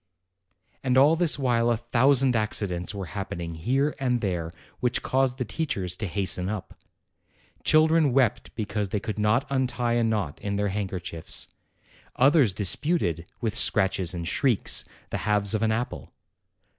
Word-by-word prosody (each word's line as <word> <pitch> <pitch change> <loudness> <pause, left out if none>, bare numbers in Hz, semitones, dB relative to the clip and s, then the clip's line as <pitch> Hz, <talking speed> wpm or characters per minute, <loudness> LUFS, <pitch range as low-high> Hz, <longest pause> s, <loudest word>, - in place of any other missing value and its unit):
And 130 -1 +2
all 145 +5 +6
this 170 -3 +2
while 120 -4 +1
a 120 - +2
thousand 130 +2 +3
accidents 95 -5 -1
were 100 -2 -5
hap 100 -2 -4
pening 85 -1 -5
here 135 - 0
and 125 -2 +1
there 90 -6 -2 0.3
which 125 0 0
caused 130 -1 +1
the 125 - -2
teachers 100 - -3
to 105 - -3
hasten 95 0 -1
up. 105 -3 -5 0.9
Children 155 -1 +4
wept 125 -2 +1
because 105 -2 -2
they 105 - -1
could 110 +1 -5
not 105 +6 +2
untie 125 -3 0
a 120 0 +2
knot 105 -9 -2
in 100 0 -3
their 100 0 0
handkerchiefs. 90 -4 -3 0.7
Others 135 - +4
disputed, 95 - +1
with 110 -3 -1
scratches 95 -4 +2
and 85 -1 -4
shrieks, 125 -1 +1 0.3
the - - -1
halves 105 -1 +2
of 110 - 0
an 110 -1 +2
apple. 110 - -3
110 Hz, 155 wpm, -26 LUFS, 95-130 Hz, 0.9 s, all